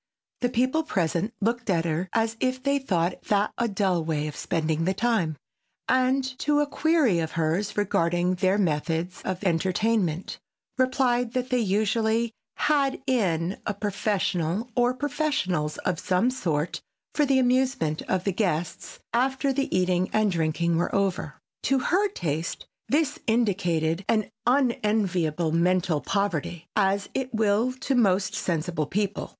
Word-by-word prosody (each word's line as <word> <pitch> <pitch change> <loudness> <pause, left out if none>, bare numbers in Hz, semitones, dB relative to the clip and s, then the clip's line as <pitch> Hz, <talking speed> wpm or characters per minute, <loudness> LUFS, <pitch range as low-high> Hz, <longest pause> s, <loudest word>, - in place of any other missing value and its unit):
The 245 - +1
people 255 +6 +1
present 190 - -1
looked 230 +2 -1
at 170 -3 +2
her 170 +3 -1
as 225 0 0
if 255 0 -1
they 280 0 +2
thought 180 -8 -1
that 205 0 +1
a 235 - +2
dull 190 -5 0
way 155 -2 -1
of 150 - -6
spending 160 0 -1
the 190 +1 +1
time, 205 -10 0 0.5
and 260 +1 +3 0.2
to 295 0 +2
a 295 - +3
query 295 - +2
of 160 -1 -3
hers 165 +6 -1
regarding 175 -3 +1
their 185 +2 +2
methods 165 0 -1
of 185 +1 -3
entertainment, 185 0 0 0.4
replied 255 -2 +1
that 255 0 -2
they 250 - +3
usually 220 +2 +1 0.2
"had 280 -3 +1
in" 190 -8 0
a 210 - -1
professional 200 0 -1
or 245 0 +2
professionals 270 - -1
of 170 - 0
some 185 +8 +1
sort 165 - -2 0.3
for 300 - +2
the 275 -2 +3
amusement 255 - +1
of 185 -1 +1
the 195 - 0
guests 175 -5 -2 0.2
after 265 +3 +1
the 275 0 -1
eating 180 0 +1
and 215 -2 +2
drinking 165 0 0
were 175 - -1
over. 195 -2 -1 0.3
To 270 - +4
her 370 +10 +2
taste 165 - -3 0.2
this 300 +1 +1
indicated 185 -7 +1
an 215 -2 +1 0.2
unenviable 210 - +1
mental 175 -1 +2
poverty, 180 -4 -2
as 200 -1 +2
it 260 -1 -2
will 220 +3 +2
to 275 - 0
most 200 -6 +2
sensible 165 -2 -1
people. 205 +3 -2
200 Hz, 145 wpm, -26 LUFS, 170-245 Hz, 0.5 s, To